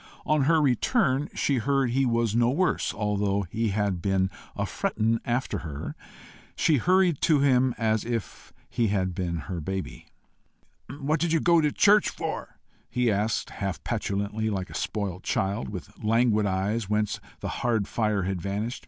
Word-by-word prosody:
On 150 -3 +2
her 160 +2 +4
return 145 - +2
she 140 - +1
heard 135 0 +1
he 135 +1 +2
was 115 -2 +1
no 120 +1 +3
worse, 175 +7 +1
although 100 -1 0
he 115 +1 0
had 100 -3 0
"been 95 -1 +1 0.2
a - - -1
frettin' 115 +1 0
after 120 +2 -1
her." 75 -3 -6 0.6
She 155 -3 +3
hurried 180 +2 +3
to 150 -4 +4
him 130 -2 +3
as 110 -2 +1
if 115 -3 -5 0.2
he 120 -2 0
had 95 -3 0
been 85 -3 -2
her 90 -3 -4
baby. 95 +4 -5 0.8
"What 145 +3 -1
do 170 - +1
you 165 0 +2
go 170 0 +4
to 150 -1 +2
church 210 +5 +5
for?" - - -5 0.3
he 125 -2 +1
asked, 105 +2 -1
half 95 -6 -4
petulantly, 100 +2 -2
like 95 -3 -3
a - - -9
spoilt 100 -4 -3
child, 100 +4 -1
with 105 +2 -9
languid 110 -1 +3
eyes 100 +3 -1
whence 105 -1 0 0.2
the - - -4
hard 115 -5 +1
fire 105 -4 0
had 95 -1 -2
vanished. 105 +6 -3
110 Hz, 165 wpm, -26 LUFS, 100-130 Hz, 0.8 s, church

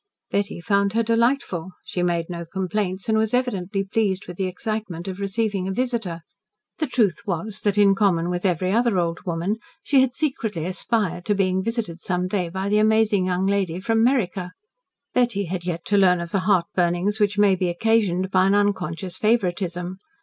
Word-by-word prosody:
Betty 200 -3 -1
found 200 +2 +1
her 230 +1 +2
delightful. 230 -6 0
She 180 - -3
made 170 -1 +1
no 170 -1 -5
complaints, 190 +2 -3
and 220 -1 +3
was 220 +2 +1
evidently 200 -6 -1
pleased 195 -1 -1
with 180 - -8
the 190 - 0
excitement 190 -2 -4
of 190 0 -5
receiving 200 -1 -1
a - - -1
visitor. 225 -7 -2 0.6
The 310 - 0
truth 235 -5 +1
was, 195 +3 -2
that 205 -1 +1
in 200 -1 +6
common 180 -4 +1
with 175 0 -3
every 185 -1 +1
other 230 -1 +2
old 170 -1 0
woman, 175 +5 -1 0.3
she 275 -2 +4
had 260 -1 +1
secretly 220 - -2
aspired 185 -1 -1
to 205 - +1
being 190 -1 +1
visited 215 -7 -3
some 180 0 -1
day 185 -3 -1
by 190 +3 -3
the 210 +1 +3
amazing 215 -3 +3
young 185 +1 0
lady 195 -3 0
from 225 +3 +1
"Meriker." 195 -8 0 0.6
Betty 235 -5 +1
had 175 0 -4
yet 170 -2 -3
to 205 - +2
learn 180 -2 +4
of 170 -1 -5
the 190 -1 -1
heartburnings 180 +2 +1
which 205 -1 +1
may 205 -1 +5
be 180 -1 0
occasioned 190 -1 +1
by 185 0 +4
an 195 - +3
unconscious 185 -3 -1
favouritism. 185 -4 0
195 Hz, 185 wpm, -23 LUFS, 180-215 Hz, 0.6 s, in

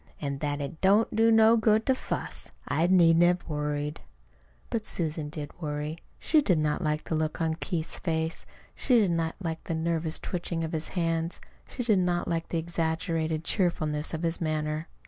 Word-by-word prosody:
An' 140 -2 -3
that 145 0 -2
it 150 +3 -6
don't 205 +4 +4
do 225 +1 +5
no 225 0 +6
good 220 -1 +3
to 265 - +4
fuss. 255 - -3 0.2
I 160 +4 +2
needn't 170 -2 +6
have 175 +1 +2
worried." 150 -1 -2 0.7
But 225 -2 -1
Susan 155 -6 -2
did 150 -1 -6
worry. 150 +1 -3 0.2
She 310 -1 +3
did 185 - +2
not 155 +1 0
like 150 0 0
the - - -4
look 155 +1 -1
on 160 -1 +1
Keith's 165 0 -4
face. 160 -1 -2 0.3
She 250 - +3
did 205 -6 +3
not 165 -1 -1
like 165 -4 -4
the 165 - -2
nervous 160 0 -1
twitching 170 -2 -3
of 160 - -3
his 160 -1 -2
hands. 165 0 0 0.3
She 250 - -4
did 215 -5 +3
not 175 -1 0
like 165 -1 -2
the 170 - -1
exaggerated 160 -1 -1
cheerfulness 155 -5 0
of 160 +1 -4
his 165 0 -1
manner. 155 0 -1
165 Hz, 185 wpm, -28 LUFS, 155-180 Hz, 0.7 s, no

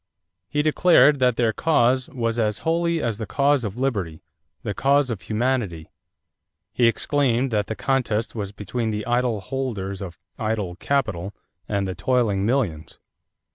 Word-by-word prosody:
He 150 0 0
declared 150 -3 +5
that 125 -2 +3
their 115 -2 +1
cause 130 -1 +2
"was 115 -2 -2
as 105 -2 +1
holy 170 0 +1
as 115 -3 -2
the 110 - -4
cause 140 +4 +2
of 105 0 -4
liberty 100 -12 -2 0.4
the 105 - -2
cause 140 +2 +2
of 110 - -4
humanity." 110 -8 -2 0.8
He 120 - +4
exclaimed 130 0 +1
that 105 -2 0
the 110 - -3
contest 120 -5 0
was 100 -3 -4
between 110 +3 -3
the 105 -1 -3
idle 120 -3 0
holders 110 -7 -4
of 90 -4 -7 0.2
idle 110 -5 -2
capital 105 -8 -1 0.3
and 100 -2 0
the 95 - -3
toiling 100 0 +1
millions. 105 - -1
115 Hz, 150 wpm, -23 LUFS, 100-130 Hz, 0.8 s, declared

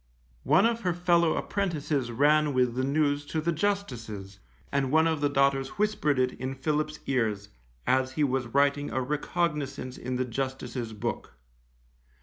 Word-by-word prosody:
One 195 - +5
of 230 0 +1
her 180 -4 0
fellow 170 -2 +3
apprentices 150 -10 -1
ran 145 +3 +3
with 125 -2 +2
the 130 +2 -1
news 145 +1 +1
to 160 - -2
the 170 +2 0
Justice's, 120 - -3 0.3
and 135 -2 0
one 160 +1 +5
of 160 -2 0
the 145 - +2
daughters 135 -1 +1
whispered 205 -9 +1
it 130 0 +2
in 130 +1 -3
Philip's 150 +2 -1
ears, 110 -6 -1 0.4
as 130 0 +2
he 150 - +1
was 130 -3 0
writing 140 +3 +2
a 130 - -1
recognizance 145 -1 -2
in 125 +1 -3
the 130 +1 0
Justice's 125 -2 -4
book. 105 - -4
140 Hz, 155 wpm, -28 LUFS, 130-155 Hz, 0.4 s, One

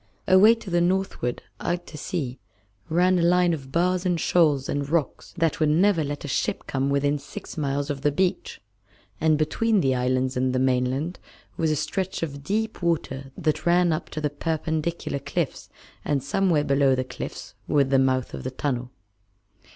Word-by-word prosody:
Away 205 +5 +7
to 220 -5 -9
the 175 0 +3
northward, 180 -9 -1 0.2
out 175 0 -2
to - - -11
sea, 140 -4 -4 0.5
ran 180 +3 +3
a - - +2
line 175 0 +4
of 135 -4 -6
bars 180 +3 +1
and 175 -3 0
shoals 150 -6 +3
and 140 0 -2
rocks 160 -2 -1
that 165 -2 +1
would 155 -2 +3
never 170 +2 +3
let 145 0 -4
a - - -5
ship 130 - -1
come 135 0 -1
within 145 +1 +1
six 140 0 -9
miles 145 -1 -1
of 140 -1 -5
the 145 +1 +2
beach, 180 +5 -1 0.6
and 155 -1 +3
between 210 +8 +1
the 135 -6 +2
islands 130 +1 0
and 130 0 +1
the - - +1
mainland 130 +6 0 0.4
was 160 -1 0
a 155 - +2
stretch 185 +5 -2
of 140 -3 -5
deep 220 +7 -2
water 135 -6 -2
that 155 -2 -1
ran 175 -1 +4
up 155 - -4
to - - -5
the 150 -1 -1
perpendicular 160 0 -2
cliffs, 140 - -3 0.3
and 140 -3 0
somewhere 165 0 +2
below 140 -2 +3
the 130 - -1
cliffs 130 - -7
was 140 -2 +2
the 135 -1 +4
mouth 130 -1 +1
of - - -6
the 130 - -2
tunnel. 130 -2 -3
150 Hz, 180 wpm, -25 LUFS, 135-175 Hz, 0.6 s, Away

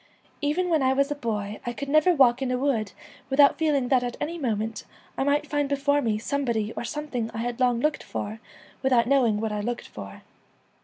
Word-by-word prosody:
Even 300 +5 0
when 320 -3 +2
I 260 0 +3
was 275 +2 +1
a - - 0
boy 210 -6 -3
I 240 - -3
could 280 +4 -6
never 310 +5 +4
walk 260 -5 +4
in 265 - -1
a 255 - 0
wood 245 -7 0 0.4
without 280 +2 +5
feeling 285 -6 +1
that 260 -2 +4
at 245 -1 -4
any 335 +3 -3
moment 225 -4 -2 0.3
I - - 0
might 285 +2 +1
find 290 -2 -1
before 285 +1 +2
me 225 -5 0
somebody 230 -3 -1
or - - -5
something 250 -3 -3
I - - -4
had 235 +1 -3
long 245 -2 +2
looked 300 +1 0
for 215 +2 -5 0.4
without 255 -3 +3
knowing 240 -5 +3
what 220 0 -2
I 210 - -2
looked 240 +3 -4
for. 100 -1 -10
260 Hz, 210 wpm, -26 LUFS, 230-285 Hz, 0.4 s, without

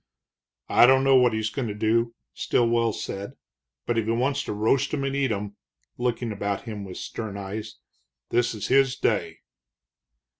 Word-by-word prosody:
"I 120 - +7
don't 130 +1 +5
know 135 0 +5
what 125 -2 +5
he's 110 0 -1
goin' 130 0 -3
to 105 - -4
do," 115 +2 +1 0.2
Stilwell 115 -1 +1
said, 100 -1 -6 0.5
"but 120 -1 +1
if 110 - -1
he 110 - 0
wants 135 +4 +1
to - - -4
roast 110 +6 +1
'em 140 - -2
and 135 0 -1
eat 135 -3 +1
'em" 100 -1 -4 0.4
looking 120 -1 -1
about 100 -1 -3
him 105 -3 -6
with 95 -2 -8
stern 110 -3 -6
eyes 105 +2 -6 0.6
"this 120 -1 +1
is 105 - -5
his 135 0 +4
day." - - -1
115 Hz, 175 wpm, -25 LUFS, 105-125 Hz, 0.6 s, I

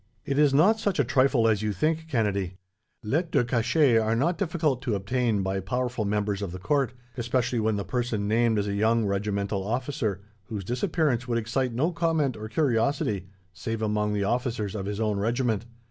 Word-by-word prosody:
"It 140 -1 0
is 150 -2 +5
not 190 +11 +4
such 200 -4 0
a 140 - +4
trifle 130 -1 +3
as 110 -2 +2
you 105 -1 -1
think, 160 - 0
Kennedy. 100 - -1 0.5
Lettres 155 +10 0
de 125 - +2
cachet 120 +2 +3
are 110 0 +1
not 160 +9 +1
difficult 160 -9 0
to 120 -5 -1
obtain, 110 +1 0
by 95 +1 -1
powerful 120 +3 -2
members 105 -1 -1
of 100 -4 -3
the 90 - -6
court; 135 +6 0 0.2
especially 120 0 0
when 110 -1 +1
the 100 - -3
person 120 -5 -1
named 115 +1 +2
is 105 0 0
a 100 - -1
young 110 +2 +2
regimental 100 0 -1
officer, 110 -3 -2 0.2
whose 105 -3 -5
disappearance 130 - 0
would 120 -1 0
excite 120 +3 -1
no 150 +9 +1
comment 165 -6 0
or 110 0 -7
curiosity, 115 - 0 0.3
save 115 +3 -4
among 105 -1 0
the 100 -1 0
officers 115 -2 -1
of 100 -2 -4
his 105 0 -3
own 105 -2 0
regiment. 115 0 0
115 Hz, 190 wpm, -26 LUFS, 105-130 Hz, 0.5 s, is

